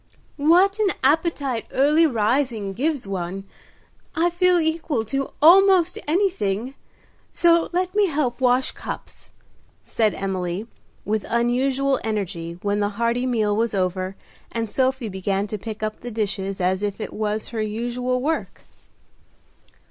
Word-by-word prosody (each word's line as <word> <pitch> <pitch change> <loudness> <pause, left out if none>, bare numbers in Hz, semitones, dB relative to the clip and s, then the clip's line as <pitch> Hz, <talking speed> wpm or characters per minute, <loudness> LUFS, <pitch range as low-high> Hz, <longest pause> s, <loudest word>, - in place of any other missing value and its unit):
"What 360 +8 +4
an 405 -4 +2
appetite 280 -4 +1
early 300 +5 +4
rising 230 -4 0
gives 285 +3 -1
one. 190 0 -4 0.7
I 345 +1 +2
feel 360 +1 +3
equal 315 -7 -1
to 275 +5 -2
almost 365 +1 +6
anything, 275 - 0 0.6
so 335 -1 +3
let 365 +1 -1
me 415 -1 +3
help 280 -6 -1
wash 250 +1 +3
cups," - - -8 0.5
said 215 -3 0
Emily, 190 0 -3 0.4
with 215 -1 -1
unusual 260 +3 +1
energy, 175 -6 -3
when 205 0 0
the 205 0 +1
hearty 235 +2 0
meal 215 -4 +1
was 225 0 0
over 185 0 -1 0.4
and 225 -2 -3
Sophie 260 -2 0
began 195 0 -1
to 210 0 -5
pick 215 +1 -7
up 215 0 -3
the 245 - -7
dishes 200 -3 -3
as 185 +1 +1
if 205 0 -3
it - - -5
was 215 0 -2
her 225 -2 -3
usual 245 +4 -2
work. 320 +2 -2
235 Hz, 135 wpm, -23 LUFS, 205-300 Hz, 0.7 s, almost